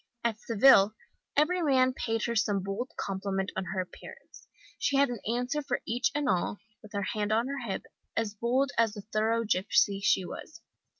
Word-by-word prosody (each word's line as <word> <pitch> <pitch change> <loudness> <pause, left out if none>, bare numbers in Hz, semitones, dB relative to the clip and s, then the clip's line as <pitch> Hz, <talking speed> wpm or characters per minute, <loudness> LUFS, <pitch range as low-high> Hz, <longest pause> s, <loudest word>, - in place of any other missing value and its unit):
At 225 -2 0
Seville 220 -3 +5 0.4
every 350 +5 +3
man 260 -4 +3
paid 225 -3 -2
her 235 - -1
some 205 -3 +1
bold 195 +6 -3
compliment 195 0 -2
on 190 - -2
her 190 +1 -3
appearance. 180 - -12 0.3
She 280 - +1
had 280 -1 +4
an 240 -3 -4
answer 250 +5 -1
for 255 -3 -3
each 245 +5 +1
and 295 -1 0
all, 185 -1 0 0.2
with 215 0 -14
her 200 -1 -1
hand 210 +1 -2
on 225 +2 +2
her 280 0 -3
hip, 190 - -3 0.3
as 225 -2 0
bold 250 +6 +1
as 225 -2 +3
the 205 -2 -8
thorough 225 +2 +2
gipsy 200 0 +2
she 190 -2 +3
was. - - -9
225 Hz, 185 wpm, -29 LUFS, 200-255 Hz, 0.4 s, Seville